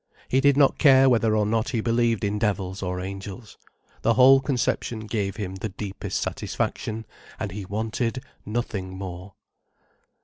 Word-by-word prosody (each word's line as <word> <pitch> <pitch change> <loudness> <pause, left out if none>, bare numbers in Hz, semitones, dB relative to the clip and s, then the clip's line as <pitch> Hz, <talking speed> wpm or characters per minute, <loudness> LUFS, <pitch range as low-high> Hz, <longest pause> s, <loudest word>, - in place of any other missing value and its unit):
He 130 - +3
did 140 -1 +4
not 140 -2 +4
care 135 -3 +7
whether 115 -3 +3
or 105 - +2
not 110 +2 0
he 115 - -1
believed 115 -2 +1
in 105 +1 0
devils 100 -3 -1
or 90 -1 -2
angels. 95 +3 -7 0.4
The 115 +1 +2
whole 130 +3 +8
conception 125 -4 -1
gave 105 -3 -2
him 95 -3 -5
the 110 +3 -4
deepest 100 0 -4
satisfaction, 110 0 -3 0.3
and 105 -2 -3
he 100 +1 -6
wanted 115 +5 -2 0.2
nothing 105 -4 -4
more. 95 0 -7
110 Hz, 150 wpm, -25 LUFS, 100-120 Hz, 0.4 s, whole